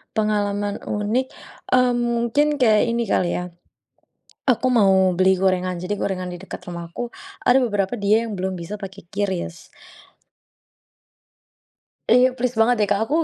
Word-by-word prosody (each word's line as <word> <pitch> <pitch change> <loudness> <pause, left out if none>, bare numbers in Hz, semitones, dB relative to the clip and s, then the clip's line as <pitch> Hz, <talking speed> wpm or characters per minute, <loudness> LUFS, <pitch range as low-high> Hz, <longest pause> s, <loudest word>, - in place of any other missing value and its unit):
Pengalaman 205 -1 0
unik, 215 +6 -1 0.4
mmm, 250 -1 +4
mungkin 240 +5 +1
kayak 215 -4 +4
ini 235 0 0
kali, 180 -2 +1
ya. 180 - -3 1.0
Aku 255 +1 +1
mau 190 -6 +4
beli 185 +1 +3
gorengan. 185 -1 0
Jadi 180 +4 -3
gorengan 185 -2 -3
di 175 - -7
dekat - - -9
rumahku 170 +8 -6 0.4
ada 250 +2 +6
beberapa 205 -2 0
dia 215 +1 +2
yang 215 - -5
belum 190 0 -3
bisa 170 +5 -6
pakai 195 0 -9
QRIS 190 -3 -4 2.4
Iya, 250 +2 +5
plis 250 -1 -2
banget, 225 +2 +4
deh, 205 - +2
Kak. 200 0 +2
Aku, 290 - -1
205 Hz, 140 wpm, -22 LUFS, 190-240 Hz, 2.4 s, ada